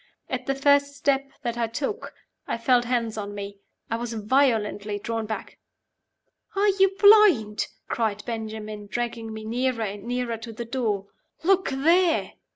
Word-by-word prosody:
At 255 -1 -3
the 275 - +1
first 285 +1 +3
step 275 -1 +1
that 240 -1 -2
I 230 - +1
took, 280 - -4 0.3
I - - -1
felt 245 +1 +3
hands 230 -3 -1
on 205 0 -5
me 200 0 -7 0.3
I 230 - -1
was 235 0 -4
violently 215 -3 +1
drawn 225 +1 -3
back. 220 - -6 1.0
"Are 405 +1 +3
you 385 0 +3
blind?" 400 - +6 0.2
cried 215 -3 -1
Benjamin, 215 -2 -5
dragging 230 +1 -3
me 220 0 -7
nearer 240 +1 0
and 200 -1 -5
nearer 245 -1 -2
to 225 +1 -8
the 235 +2 -6
door. 225 -5 -1 0.4
"Look 380 +2 +3
there!" 330 +6 +2
235 Hz, 155 wpm, -25 LUFS, 215-275 Hz, 1.0 s, blind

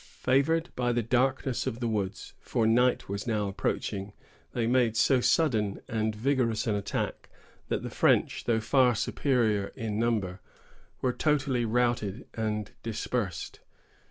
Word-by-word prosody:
Favored 155 +6 +2
by 120 -1 +1
the 120 -1 0
darkness 130 +2 0
of 115 - -3
the 120 - -1
woods,——for 105 +1 -2
night 125 +3 +3
was 100 +2 -4
now 105 -3 0
approaching,——they 100 +4 -4
made 120 -2 +2
so 130 +1 +4
sudden 110 -10 +2
and 110 -1 -1
vigorous 120 -2 +1
an 110 - +1
attack, 100 -1 -3 0.4
that - - -2
the - - -4
French, - - +2
though 115 -2 +2
far 125 +1 +3
superior 110 -5 +1
in 110 -4 -3
number, 105 -6 0 0.6
were 125 -1 +1
totally 135 -5 +1
routed 120 -2 0
and 105 -2 -2
dispersed. 105 -6 -3
115 Hz, 130 wpm, -28 LUFS, 105-125 Hz, 0.6 s, so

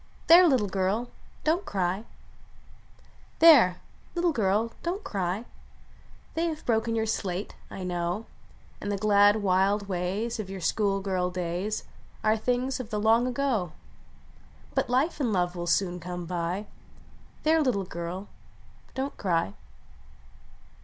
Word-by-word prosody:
There! 350 +2 +8
little 255 -9 +3
girl; 195 +5 -1 0.3
don 320 +3 +2
t - - -15
cry! 190 +2 -1 1.3
There! 270 - +7 0.3
little 345 0 +2
girl; 220 -2 +1
don 345 +2 -1
t - - -15
cry! 195 +3 -2 0.9
They 330 +1 0
have 315 -2 -5
broken 230 0 +1
your 220 -1 +1
slate. 200 -3 -3
1 185 -1 -6
know; 175 +4 -2 0.6
And 205 - -3
the 200 - -1
glad, 205 +1 +4
wild 195 +2 +2
ways 195 +6 -2
Of 200 -3 -4
your 195 0 -6
school 195 +2 +1
girl 185 -2 0
days 180 +4 -3 0.4
Are 215 0 +4
things 250 +4 -1
of 245 -4 -6
the 210 -2 -2
long 225 +3 +4
ago; 245 - -1 1.0
But - - 0
life 270 +7 +1
and 250 -6 +1
love 180 -2 0
will 175 0 -4
soon 180 +1 +1
come 175 0 -6
by. 175 +3 -2 0.8
There! 320 +1 +4
little 230 -9 +1
girl; 175 +3 -5 0.7
don 270 +2 -2
t - - -27
cry 165 - 0
205 Hz, 140 wpm, -27 LUFS, 180-240 Hz, 1.3 s, There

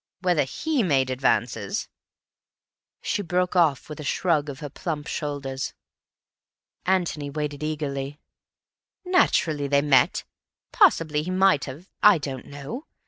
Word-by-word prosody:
Whether 175 -6 +2
he 295 - -1
made 135 - +2
advances—" 115 -5 0 1.2
She 205 - -1
broke 180 0 0
off 160 -7 +3
with 150 -1 -8
a - - -5
shrug 150 0 +1
of 135 -1 -7
her 145 - -6
plump 150 -1 -4
shoulders. 140 -4 -4 1.1
Antony 175 -6 0
waited 145 0 -4
eagerly. 145 -2 -3 0.9
"Naturally 160 - +2
they 140 0 +3
met. 135 -4 +3 0.5
Possibly 155 -2 +4
he 165 - -5
might 185 -5 +3
have—I 180 +8 +2
don't 135 -4 -6
know. 145 - -7
150 Hz, 120 wpm, -25 LUFS, 140-175 Hz, 1.2 s, Possibly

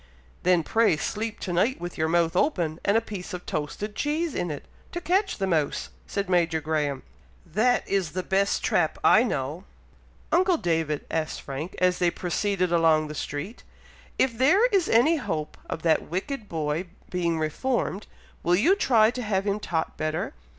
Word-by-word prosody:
"Then 180 -2 +3
pray 225 -3 +3
sleep 220 +7 -3
to 180 - -3
night 215 +10 +2
with 175 0 -6
your 160 - 0
mouth 170 0 +2
open, 175 - +1
and 200 +2 +3
a - - +2
piece 195 -5 -6
of 180 - -9
toasted 180 +8 -4
cheese 305 +1 -1
in 175 - -2
it, 145 -2 -6 0.3
to 345 - -2
catch 380 +4 +1
the 195 - 0
mouse," 160 -6 0 0.2
said 200 0 -2
Major 170 -3 +2
Graham. 150 -3 -1 0.4
"That 220 +9 +1
is 190 -5 0
the 185 0 -2
best 195 +1 +1
trap 160 -3 +1
I 220 - +7
know!" 155 - -2 0.7
"Uncle 360 0 +4
David," 160 - -1
asked 160 -1 -2
Frank, 140 +6 -5
as 180 -1 +2
they 175 - +3
proceeded 185 +1 -1
along 160 -2 +3
the - - -5
street, 150 +9 -5 0.6
"if 255 -3 +2
there 330 - +4
is 385 -6 +2
any 260 +9 +4
hope 155 - -3
of 165 - -4
that 160 -2 +2
wicked 210 - -4
boy 155 +2 -2 0.2
being 170 -2 0
reformed, 195 - -1 0.3
will 175 +1 +3
you 320 - +4
try 230 - +4
to 250 - -5
have 200 -4 0
him 205 0 0
taught 165 -5 -2
better? 155 +2 -2
180 Hz, 175 wpm, -26 LUFS, 160-225 Hz, 0.7 s, I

